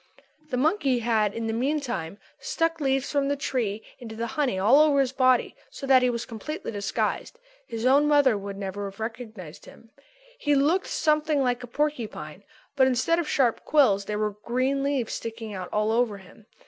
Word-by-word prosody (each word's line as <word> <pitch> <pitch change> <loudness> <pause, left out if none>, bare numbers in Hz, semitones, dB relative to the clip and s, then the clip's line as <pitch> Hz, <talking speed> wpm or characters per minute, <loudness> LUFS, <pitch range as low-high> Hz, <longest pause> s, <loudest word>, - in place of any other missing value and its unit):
The 250 - -1
monkey 285 -2 +2
had, 220 -3 +1
in 230 - -3
the 225 - -1
meantime, 240 - -2 0.2
stuck 330 -1 -1
leaves 270 -1 0
from 280 -1 +1
the 285 - +1
trees 235 -7 -2 0.2
into 225 -3 -8
the 230 +1 -3
honey 275 -10 0
all 220 +9 +5
over 300 -2 +4
his 265 -2 +2
body 255 -2 +2
so - - -8
that 265 -1 +6
he 250 - +3
was 235 -1 -3
completely 240 +7 -6
disguised. 205 - -2 0.3
His 230 +1 -4
own 280 +3 +5
mother 285 -5 +4
would 200 -1 -6
never 200 +1 -4
have 195 - -17
recognised 220 -7 -7
him. 225 - -16 0.5
He 295 -7 +2
looked 315 +8 +2
something 305 -2 +1
like 250 -1 0
a 245 - -8
porcupine; 235 - -3 0.3
but 265 -2 +5
instead 260 +7 +2
of 330 - -3
sharp 245 -5 +1
quills 215 -10 +3
there 210 0 -3
were 210 0 0
green 260 +3 0
leaves 275 -4 -1
sticking 225 -1 -6
out 185 -2 -6
all 210 +1 +1
over 230 -3 +1
him. 195 +3 -17
245 Hz, 185 wpm, -26 LUFS, 215-280 Hz, 0.5 s, that